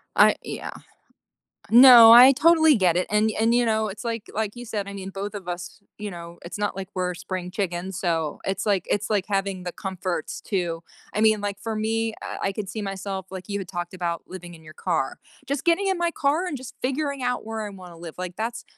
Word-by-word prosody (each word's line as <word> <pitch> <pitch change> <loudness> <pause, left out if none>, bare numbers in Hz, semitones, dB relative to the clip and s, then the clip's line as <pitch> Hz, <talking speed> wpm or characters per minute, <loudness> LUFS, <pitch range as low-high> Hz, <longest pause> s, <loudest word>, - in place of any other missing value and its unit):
I - - +7
uh - - -3
yeah. - - -6 1.0
No. 240 -1 +10
I 250 +3 +10
totally 320 +1 +5
get 180 -5 +2
it. 180 - +1
And 215 +1 +3
and, 225 +1 +3
you 245 - +3
know, 220 -1 +1
it's 195 - -8
like 230 -2 -3
like 215 0 -2
you 245 0 -8
said, 210 -3 -4
I 200 - -7
mean, 195 -1 -7
of 200 -1 -5
us, 175 +2 -6 0.2
you 210 0 -4
know, 170 -1 -10
it's 175 - -7
not 205 -2 -2
like 190 -1 -6
we're 180 -1 -1
spring 180 0 -5
chickens. 185 -1 -3
So 165 -5 -1
it's 195 +1 -2
like 200 -4 +1
it's 205 +1 0
like 205 -3 +1
having 195 -2 -2
the 180 - -4
comforts 185 -3 -4
too. 175 -4 -2 0.3
I 210 - -1
mean, 215 -1 +4
like, 200 -1 -3
for 225 -1 -4
me, 225 +1 -1
uh, - - -5
I 195 - 0
could 195 -1 -5
see 215 +1 -5
myself 195 -1 -5
like 185 -1 -8
you 200 0 -2
had 185 - -6
talked 175 -1 -5
about 170 -2 -3
living 175 -2 -9
in 160 - -17
your 155 0 -13
car. 160 -7 -2 0.3
Just 280 0 -2
getting 345 +4 +3
in 380 - +1
my 345 0 +2
car 310 +4 0
and 295 -6 -3
just 255 -1 -9
figuring 280 +1 -2
out 245 -2 -1
where 225 0 -4
I 210 - -4
wanna 180 -4 -12
live. 165 -1 -9
Like, 180 -1 -5
that's 230 +2 -4
200 Hz, 230 wpm, -24 LUFS, 180-225 Hz, 1.0 s, No